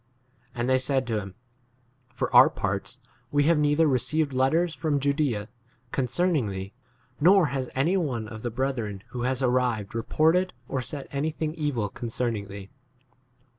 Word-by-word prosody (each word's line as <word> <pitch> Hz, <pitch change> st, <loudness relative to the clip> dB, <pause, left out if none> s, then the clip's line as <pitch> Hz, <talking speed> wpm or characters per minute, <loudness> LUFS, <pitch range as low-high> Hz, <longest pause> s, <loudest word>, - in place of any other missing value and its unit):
And 120 Hz, 0 st, -1 dB
they 130 Hz, 0 st, +3 dB
said 135 Hz, 0 st, 0 dB
to 115 Hz, -3 st, -1 dB
him, 95 Hz, -2 st, -8 dB, 0.8 s
For -, -, -2 dB
our -, -, +9 dB
parts, -, -, -3 dB, 0.3 s
we 145 Hz, 0 st, +3 dB
have 160 Hz, +1 st, +3 dB
neither 150 Hz, +2 st, +3 dB
received 145 Hz, +2 st, +1 dB
letters 155 Hz, +6 st, +2 dB
from 150 Hz, -4 st, 0 dB
Judsea 140 Hz, -7 st, 0 dB, 0.4 s
concerning 145 Hz, -, +1 dB
thee, 95 Hz, 0 st, -5 dB, 0.5 s
nor 185 Hz, +3 st, +6 dB
has 130 Hz, -2 st, -2 dB
any 160 Hz, +9 st, +2 dB
one 125 Hz, -, -2 dB
of 110 Hz, 0 st, -8 dB
the 120 Hz, -, -2 dB
brethren 115 Hz, -5 st, -3 dB
who 125 Hz, -, -5 dB
has 130 Hz, 0 st, -2 dB
arrived 125 Hz, -5 st, +1 dB
reported 160 Hz, +10 st, +2 dB
or 130 Hz, -, -2 dB
said 135 Hz, +3 st, -6 dB
any 145 Hz, +3 st, -1 dB
22 -, -, -33 dB
thing 155 Hz, -1 st, -2 dB
evil 145 Hz, -9 st, -1 dB
concerning 115 Hz, -1 st, -3 dB
thee. 100 Hz, 0 st, -9 dB
130 Hz, 160 wpm, -26 LUFS, 115-150 Hz, 0.8 s, our